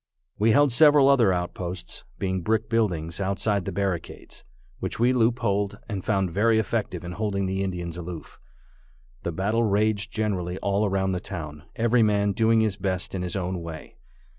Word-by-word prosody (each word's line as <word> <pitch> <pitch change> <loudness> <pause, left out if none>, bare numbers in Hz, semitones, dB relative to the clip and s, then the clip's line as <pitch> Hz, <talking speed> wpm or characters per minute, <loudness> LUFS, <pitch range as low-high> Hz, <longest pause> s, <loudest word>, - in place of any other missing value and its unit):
We 110 +2 +4
held 145 +5 +5
several 145 +1 +6
other 125 -8 +5
outposts, 90 0 -4
being 95 -1 -1
brick 110 +3 0
buildings 90 -7 0
outside 100 0 0
the - - -3
barricades, 95 -3 -4 0.4
which - - -4
we 120 +2 +4
loopholed, 110 -4 +1
and 100 -4 -4
found 95 -3 0
very 110 +5 +3
effective 105 -5 -1
in 90 - -6
holding 100 0 -1
the 95 +1 -1
Indians 90 -3 -3
aloof. 85 -3 -8 0.8
The 85 - -3
battle 105 +7 0
raged 105 0 +1
generally 95 -5 -2
all 100 +2 0
around 95 0 0
the 90 - -1
town, 75 -5 -7
every 115 +1 +3
man 105 -2 +3
doing 115 +1 +3
his 105 -3 0
best 95 -2 -2
in 95 - -2
his 90 +1 -3
own 90 -2 -2
way. 80 -2 -9
100 Hz, 165 wpm, -25 LUFS, 90-110 Hz, 0.8 s, several